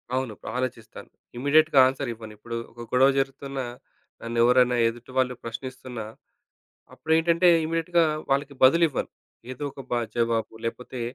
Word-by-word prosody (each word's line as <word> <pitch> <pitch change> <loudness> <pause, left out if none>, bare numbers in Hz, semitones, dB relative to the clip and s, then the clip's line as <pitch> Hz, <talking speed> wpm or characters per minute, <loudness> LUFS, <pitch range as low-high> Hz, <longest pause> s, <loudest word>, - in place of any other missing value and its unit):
అవును. 130 -4 -2 0.2
ఆలోచిస్తాను. 120 -3 -5 0.3
ఇమ్మీడియేట్‌గా 145 +3 +4
ఆన్సర్ 135 0 -3
ఇవ్వను. 110 -1 -11
ఇప్పుడు 115 +2 -7 0.2
ఒక 120 0 -12
గొడవ 130 +2 +5
జరుగుతున్నా 135 -1 -3 0.6
నన్ను 115 0 -5
ఎవరైనా 125 0 +4
ఎదుటివాళ్ళు 125 +2 -2
ప్రశ్నిస్తున్నా 125 0 -7 0.9
అప్పుడేంటంటే 165 +2 +2 0.2
ఇమ్మీడియేట్‌గా 165 +1 +1 0.3
వాళ్ళకి 140 +1 0
బదులివ్వను. 155 +2 +4 0.4
ఏదో 130 +3 -7
ఒక 135 - -9
బ - - +1 0.2
జవాబు 115 -2 0
లేపోతే 125 +1 -5
130 Hz, 120 wpm, -25 LUFS, 120-140 Hz, 0.9 s, గొడవ